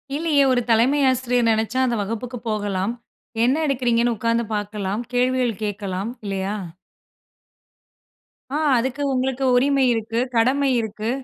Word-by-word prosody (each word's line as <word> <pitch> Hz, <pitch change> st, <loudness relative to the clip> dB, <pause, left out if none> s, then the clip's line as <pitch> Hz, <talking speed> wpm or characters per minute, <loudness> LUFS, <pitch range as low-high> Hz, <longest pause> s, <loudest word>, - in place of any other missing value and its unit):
இல்லியே! 300 Hz, -2 st, +2 dB
ஒரு 250 Hz, -1 st, +2 dB
தலைமை 240 Hz, +6 st, +3 dB
ஆசிரியர் 250 Hz, -2 st, +1 dB
நெனச்சா, 220 Hz, +3 st, 0 dB
அந்த 240 Hz, -, 0 dB
வகுப்புக்கு 230 Hz, +4 st, -4 dB
போகலாம். 205 Hz, 0 st, -1 dB, 0.5 s
என்ன 255 Hz, +3 st, +3 dB
எடுக்கிறீங்கன்னு 240 Hz, -3 st, +1 dB
உக்காந்து 230 Hz, +1 st, 0 dB
பாக்கலாம், 205 Hz, +1 st, -3 dB
கேள்விகள் 250 Hz, -2 st, +1 dB
கேக்கலாம், 200 Hz, 0 st, -4 dB
இல்லையா? 195 Hz, 0 st, -2 dB, 1.9 s
ஆ. 280 Hz, -, -4 dB, 0.2 s
அதுக்கு 260 Hz, +4 st, -2 dB
உங்களுக்கு 260 Hz, +1 st, -1 dB
உரிமை 275 Hz, +2 st, +3 dB
இருக்கு, 225 Hz, 0 st, -2 dB, 0.2 s
கடமை 270 Hz, +4 st, +3 dB
இருக்கு, 220 Hz, 0 st, -4 dB
235 Hz, 115 wpm, -22 LUFS, 215-255 Hz, 1.9 s, தலைமை